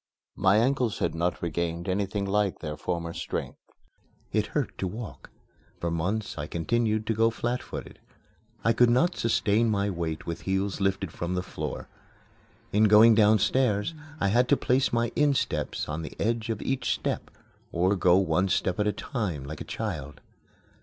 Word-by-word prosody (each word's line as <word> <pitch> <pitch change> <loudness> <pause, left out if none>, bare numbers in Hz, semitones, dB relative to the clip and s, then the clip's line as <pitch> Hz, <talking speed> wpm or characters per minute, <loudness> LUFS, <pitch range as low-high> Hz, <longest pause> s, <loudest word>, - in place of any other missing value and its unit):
My 95 +2 +4
ankles 125 -1 +1
had - - 0
not 85 +2 -1
regained 85 +1 -2
anything 100 +1 -1
like 100 -1 +1
their 75 -1 -5
former 85 +1 -3
strength. - - -4 0.7
It - - +1
hurt - - -2
to 95 - -1
walk. 110 +4 -8 0.5
For 85 - -2
months 90 +3 -2
I 75 - -3
continued 110 +6 0
to 115 - +1
go 115 +1 +3
flat 120 +2 -2
footed. - - -8 0.6
I 115 - +4
could 120 0 +5
not 165 +9 +3
sustain 115 0 +2
my 100 -1 +1
weight 85 -3 -3
with 85 - -4
heels 95 +1 -1
lifted 95 -2 0
from 85 +2 -3
the 90 - -1
floor. - - -5 0.8
In 105 +2 +4
going 110 +2 +8
downstairs 110 +3 +3 0.3
I 100 - +2
had 120 +5 +3
to 145 - +5
place 130 +1 +2
my 115 0 +1
insteps 130 - 0
on 75 +2 -3
the 80 - -8
edge 115 +1 0
of 110 -2 -2
each 135 -1 -1
step, - - -3 0.4
or 90 +4 +2
go 90 -1 +4
one 95 0 +2
step 95 +1 0
at 105 - +2
a - - +3
time, 100 - -3
like 70 - -7
a - - -2
child. 75 - -5
100 Hz, 170 wpm, -27 LUFS, 85-115 Hz, 0.8 s, going